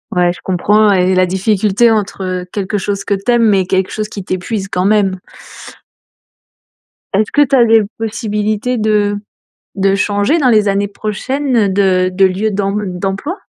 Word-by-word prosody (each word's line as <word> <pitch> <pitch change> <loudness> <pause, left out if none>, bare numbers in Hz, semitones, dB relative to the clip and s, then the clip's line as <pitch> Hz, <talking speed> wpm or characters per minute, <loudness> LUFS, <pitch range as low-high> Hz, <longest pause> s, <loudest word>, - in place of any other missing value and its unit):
Ouais, 175 -1 +3
je 180 - -9
comprends 205 +3 +2
et 185 0 +2
la 185 - +3
difficulté, 205 +4 +1
entre 190 -4 -2
quelque 205 0 -2
chose 200 0 -3
que 200 - -1
tu 200 +5 -4
aimes, 235 -2 +4
mais 195 -2 +2
quelque 190 0 -1
chose 215 -1 -3
qui 200 -3 -8
t'épuise 190 +2 -4
quand 180 +1 0
même. 200 -3 +2 1.9
Est-ce 210 +2 +1
que 290 - +3
tu 275 -1 +3
as 240 -3 +5
des 225 -1 +5 0.2
possibilités 215 +1 -2
de 210 -2 +1 0.6
de 195 0 +2
changer 205 - +1
dans 265 -4 +2
les 215 -3 +3
années 200 0 0
prochaines, 225 +1 -1
de 185 -2 +2
de 190 +1 +3
lieu 190 +4 +1
d'emb 200 0 -2 0.2
d'emploi? 200 - -4
205 Hz, 165 wpm, -14 LUFS, 190-215 Hz, 1.9 s, as